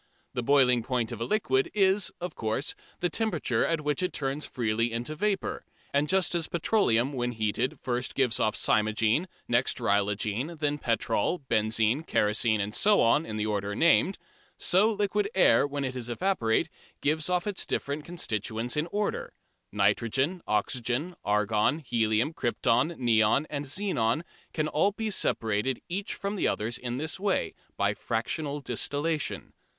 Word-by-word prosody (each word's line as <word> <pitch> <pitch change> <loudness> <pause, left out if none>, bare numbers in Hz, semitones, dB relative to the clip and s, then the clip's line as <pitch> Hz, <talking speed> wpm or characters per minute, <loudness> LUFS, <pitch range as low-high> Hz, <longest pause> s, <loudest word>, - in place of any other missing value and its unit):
The 125 - -1
boiling 125 -2 +4
point 120 -1 -1
of 115 -1 -6
a - - 0
liquid 135 -12 +1
is, 195 0 +3
of 180 -2 -5
course, 110 +6 -1 0.3
the 175 - +2
temperature 165 - 0
at 165 -2 0
which 150 +3 -1
it 180 - 0
turns 140 +1 -2
freely 115 0 -1
into 120 +6 -3
vapour, 200 +4 -1 0.3
and 145 +1 +1
just 190 -2 +2
as 170 -2 -1
petroleum 145 - +1
when 120 -2 -2
heated 110 +3 -1 0.4
gives 125 -5 +1
off 110 -1 +1
first - - +1
cymogene, 110 - +2 0.2
next 120 +2 +1
rhigolene, 105 +7 0
then 150 -1 -1
petrol, 115 +7 0
benzine, 110 +4 +2
kerosene 110 -6 +1
and 100 +1 -2
so 205 - +4
on, 145 +8 +3
in 110 - -4
the 105 - -1
order 100 -1 -2
named, 170 - +3 0.4
so 200 +5 +4
liquid 205 -1 0
air, 185 -6 +5
when 145 0 -3
it 130 0 -4
is 120 -2 -5
evaporated, 120 -5 0 0.3
gives 155 +3 +1
off 180 -1 +1
its 205 -3 -2
different 145 +2 -2
constituents 115 - -3
in 150 +2 0
order. 205 +3 -3 0.4
Nitrogen, 115 - +1
oxygen, 120 - -1
argon, 105 +6 +2
helium, 115 -1 0
krypton, 125 +4 +1
neon 115 +2 +3
and 145 -1 -3
xenon 145 - 0 0.3
can 155 -1 -1
all 195 +7 +1
be 220 +1 -3
separated 115 - 0
each 195 +3 -3
from 200 +1 -3
the - - +1
others 115 +3 -2
in 120 0 -4
this 155 +5 -3
way, 200 0 0 0.2
by - - +2
"fractional 145 +6 -3
distillation." 145 +5 -2
130 Hz, 155 wpm, -28 LUFS, 115-170 Hz, 0.4 s, air